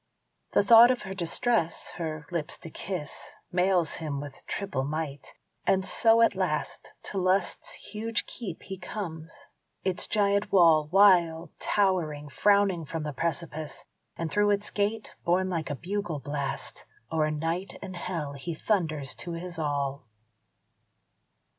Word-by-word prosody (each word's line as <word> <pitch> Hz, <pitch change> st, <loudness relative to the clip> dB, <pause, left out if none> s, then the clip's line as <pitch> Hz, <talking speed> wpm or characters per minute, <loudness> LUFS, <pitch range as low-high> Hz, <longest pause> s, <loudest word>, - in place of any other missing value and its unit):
The -, -, +5 dB
thought 230 Hz, +3 st, +9 dB
of 255 Hz, -1 st, +1 dB
her 190 Hz, -2 st, -5 dB
distress, 190 Hz, +1 st, 0 dB
her 155 Hz, -3 st, -4 dB
lips 165 Hz, -4 st, -2 dB
to 165 Hz, -, -10 dB
kiss, 175 Hz, -5 st, -6 dB, 0.2 s
Mails 180 Hz, -2 st, +2 dB
him 150 Hz, -3 st, -3 dB
with 145 Hz, -1 st, -8 dB
triple 195 Hz, -10 st, -2 dB
might; 145 Hz, 0 st, -4 dB, 0.3 s
and 190 Hz, -1 st, +3 dB
so 225 Hz, +3 st, +5 dB
at 230 Hz, -, +4 dB
last -, -, -2 dB
To 195 Hz, -, -3 dB
Lust's 185 Hz, 0 st, 0 dB
huge 220 Hz, +1 st, -3 dB
keep 195 Hz, -9 st, -7 dB
he 190 Hz, -1 st, -7 dB
comes; 165 Hz, -7 st, -7 dB, 0.4 s
its 185 Hz, -2 st, -1 dB
giant 200 Hz, -1 st, +2 dB
wall, 165 Hz, -5 st, +6 dB
Wild 175 Hz, -4 st, +5 dB
towering, 165 Hz, -8 st, +1 dB
frowning 200 Hz, 0 st, +3 dB
from 160 Hz, +1 st, -4 dB
the 150 Hz, -1 st, -4 dB
precipice; 155 Hz, 0 st, -3 dB, 0.3 s
And 165 Hz, -1 st, -3 dB
through 205 Hz, 0 st, +3 dB
its 205 Hz, 0 st, 0 dB
gate, 210 Hz, +2 st, -1 dB
borne 185 Hz, +2 st, +2 dB
like 165 Hz, -3 st, -2 dB
a 145 Hz, -, -2 dB
bugle 180 Hz, +1 st, -3 dB
blast, 140 Hz, 0 st, -4 dB, 0.3 s
O'er 155 Hz, -1 st, +2 dB
night 165 Hz, +5 st, -2 dB
and 185 Hz, -1 st, -6 dB
hell 165 Hz, -5 st, -3 dB
he 155 Hz, +4 st, -5 dB
thunders 155 Hz, -8 st, 0 dB
to 175 Hz, -, -6 dB
his 175 Hz, 0 st, -6 dB
all. 140 Hz, -3 st, -2 dB
170 Hz, 140 wpm, -28 LUFS, 155-200 Hz, 0.4 s, thought